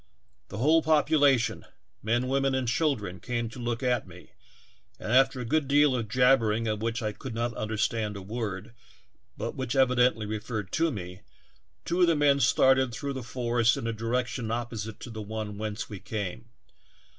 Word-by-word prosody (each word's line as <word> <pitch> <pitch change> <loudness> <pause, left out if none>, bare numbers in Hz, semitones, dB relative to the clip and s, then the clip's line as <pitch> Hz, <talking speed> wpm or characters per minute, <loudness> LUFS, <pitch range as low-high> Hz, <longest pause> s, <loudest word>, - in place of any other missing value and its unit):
The 100 - -8
whole 155 +8 +4
population, 150 -5 +3 0.4
men, 120 +4 0
women 135 0 +1
and 130 -2 -1
children, 115 - -1
came 120 -2 -3
to 120 - -11
look 120 +1 -3
at 125 -4 0
me, 90 0 -14 0.7
and 110 - -5
after 135 +1 +4
a 125 - -4
good 150 +4 +1
deal 145 -1 +4
of 115 -3 -2
jabbering, 115 -2 +3
of 105 -1 -2
which 115 +1 -2
I 105 - -1
could 120 +2 -8
not 120 +1 -1
understand 110 -1 -2
a - - -7
word 105 0 -5 0.6
but - - -3
which 130 -1 -3
evidently 125 -4 +3
referred 105 -1 -4
to 165 +1 +2
me, 90 - -7 0.6
two 175 +2 0
of 175 - +6
the 165 - +3
men 145 -1 +3
started 130 0 +4
through 140 +4 -4
the 130 - -5
forest 120 -1 +1
in - - -4
a 115 - -1
direction 120 +1 -2
opposite 115 -2 -4
to 120 - -8
the 110 -1 -6
one 105 -1 -5
whence 110 0 -4
we 105 -3 -8
came. 95 - -5
120 Hz, 180 wpm, -28 LUFS, 110-130 Hz, 0.7 s, of